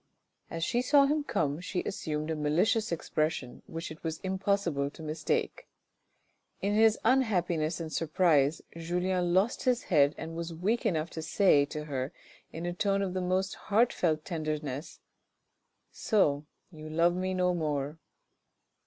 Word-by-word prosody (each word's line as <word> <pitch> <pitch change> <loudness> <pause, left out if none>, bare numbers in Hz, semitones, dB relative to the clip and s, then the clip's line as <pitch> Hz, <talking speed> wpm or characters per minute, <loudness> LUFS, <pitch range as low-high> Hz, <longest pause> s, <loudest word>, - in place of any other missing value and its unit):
As 165 0 -4
she 240 +7 +1
saw 280 +2 +5
him 295 +1 +1
come, 150 - -1
she 180 +1 -3
assumed 155 -3 -3
a - - -1
malicious 170 +9 +1
expression 155 -5 -2
which 165 0 -6
it 155 - -11
was 160 -1 -3
impossible 190 -6 0
to 160 - -12
mistake. 155 0 -2 0.9
In 200 +1 0
his 220 0 +5
unhappiness 180 -11 +2
and 160 -2 -5
surprise 155 -3 +2
Julien 175 +2 -1
lost 195 +7 +1
his 250 -1 +2
head 145 -3 +3
and 165 0 -6
was 170 0 -5
weak 215 +8 0
enough 165 -4 -1
to 160 - -5
say 160 -3 +4
to 150 +1 -6
her 135 -2 -3 0.4
in 165 +2 -6
a 175 - -2
tone 200 +2 +1
of 185 -2 -2
the 185 - -1
most 185 +2 0
heartfelt 185 -8 +1
tenderness. 155 -4 -4 0.5
" - - -50 0.2
So 150 - +3 0.2
you 155 -2 -9
love 170 +2 +3
me 185 +1 -1
no 180 0 +2
more." 150 -2 -2
170 Hz, 155 wpm, -30 LUFS, 155-190 Hz, 0.9 s, saw